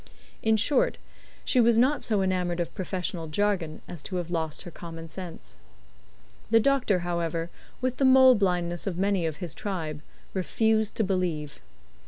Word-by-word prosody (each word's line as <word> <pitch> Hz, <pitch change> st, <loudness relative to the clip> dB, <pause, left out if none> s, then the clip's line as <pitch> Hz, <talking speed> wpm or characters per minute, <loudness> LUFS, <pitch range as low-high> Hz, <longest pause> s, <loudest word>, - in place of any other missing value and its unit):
In 220 Hz, 0 st, +3 dB
short, 295 Hz, -, +2 dB, 0.5 s
she 255 Hz, -, +2 dB
was 230 Hz, -1 st, +4 dB
not 265 Hz, +5 st, +3 dB
so 210 Hz, -4 st, +1 dB
enamoured 180 Hz, -2 st, 0 dB
of 170 Hz, -1 st, -2 dB
professional 180 Hz, -3 st, -3 dB
jargon 175 Hz, -2 st, -1 dB
as 175 Hz, -4 st, -7 dB
to 185 Hz, -, -6 dB
have 175 Hz, -1 st, -3 dB
lost 160 Hz, -3 st, -2 dB
her 175 Hz, -, -9 dB
common 165 Hz, -1 st, -8 dB
sense. 160 Hz, -, -9 dB, 0.9 s
The 225 Hz, -, +6 dB
doctor, 245 Hz, -7 st, +2 dB
however, 170 Hz, -1 st, -2 dB, 0.3 s
with 255 Hz, 0 st, -1 dB
the 275 Hz, -, +2 dB
mole 260 Hz, 0 st, +8 dB
blindness 180 Hz, -4 st, 0 dB
of 180 Hz, -3 st, -2 dB
many 195 Hz, -3 st, +1 dB
of 155 Hz, -2 st, -4 dB
his 170 Hz, -2 st, -5 dB
tribe, 160 Hz, -7 st, -4 dB, 0.3 s
refused 220 Hz, +3 st, +1 dB
to 220 Hz, -, +1 dB
believe. 180 Hz, -7 st, -2 dB
185 Hz, 160 wpm, -27 LUFS, 170-220 Hz, 0.9 s, mole